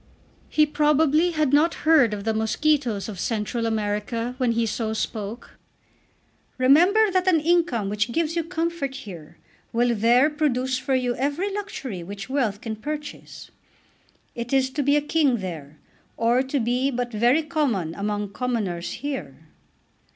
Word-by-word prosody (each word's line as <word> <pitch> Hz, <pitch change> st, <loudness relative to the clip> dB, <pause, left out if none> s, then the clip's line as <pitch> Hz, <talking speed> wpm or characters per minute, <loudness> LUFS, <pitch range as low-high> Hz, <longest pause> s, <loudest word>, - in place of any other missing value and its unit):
He 305 Hz, -, +4 dB
probably 300 Hz, +2 st, +3 dB
had 305 Hz, -5 st, 0 dB
not 315 Hz, +4 st, +4 dB
heard 305 Hz, -8 st, +5 dB
of 205 Hz, -1 st, -4 dB
the 220 Hz, +1 st, 0 dB
mosquitoes 225 Hz, 0 st, 0 dB
of 205 Hz, -5 st, -7 dB
Central 230 Hz, +2 st, -2 dB
America 220 Hz, +2 st, -2 dB
when 245 Hz, -3 st, +2 dB
he 230 Hz, 0 st, +1 dB
so 220 Hz, 0 st, -2 dB
spoke. 220 Hz, 0 st, -5 dB, 1.0 s
"Remember 355 Hz, +12 st, +5 dB
that 370 Hz, 0 st, +1 dB
an 345 Hz, -4 st, +5 dB
income 325 Hz, -, +1 dB
which 210 Hz, +3 st, -1 dB
gives 325 Hz, +3 st, -1 dB
you 335 Hz, -, 0 dB
comfort 330 Hz, -4 st, -3 dB
here 180 Hz, -, -10 dB, 0.3 s
will 240 Hz, +1 st, +2 dB
there 235 Hz, +5 st, +4 dB
produce 260 Hz, -4 st, 0 dB
for 265 Hz, 0 st, 0 dB
you 250 Hz, -1 st, 0 dB
every 290 Hz, +10 st, -1 dB
luxury 280 Hz, -, -5 dB
which 195 Hz, +4 st, -8 dB
wealth 230 Hz, -7 st, 0 dB
can 220 Hz, -2 st, -5 dB
purchase. 295 Hz, +5 st, -7 dB, 0.8 s
It 235 Hz, 0 st, -6 dB
is 265 Hz, -1 st, +2 dB
to 285 Hz, +2 st, -2 dB
be 285 Hz, +1 st, +3 dB
a 295 Hz, -, +3 dB
king 295 Hz, -4 st, +2 dB
there, 160 Hz, -7 st, -7 dB, 0.4 s
or 235 Hz, +2 st, +3 dB
to 265 Hz, +2 st, -1 dB
be 250 Hz, +3 st, +1 dB
but 245 Hz, -2 st, -3 dB
very 240 Hz, +8 st, +3 dB
common 265 Hz, -, -1 dB
among 205 Hz, +1 st, -3 dB
commoners 210 Hz, -9 st, -2 dB
here." 160 Hz, -, -6 dB
250 Hz, 150 wpm, -24 LUFS, 215-300 Hz, 1.0 s, heard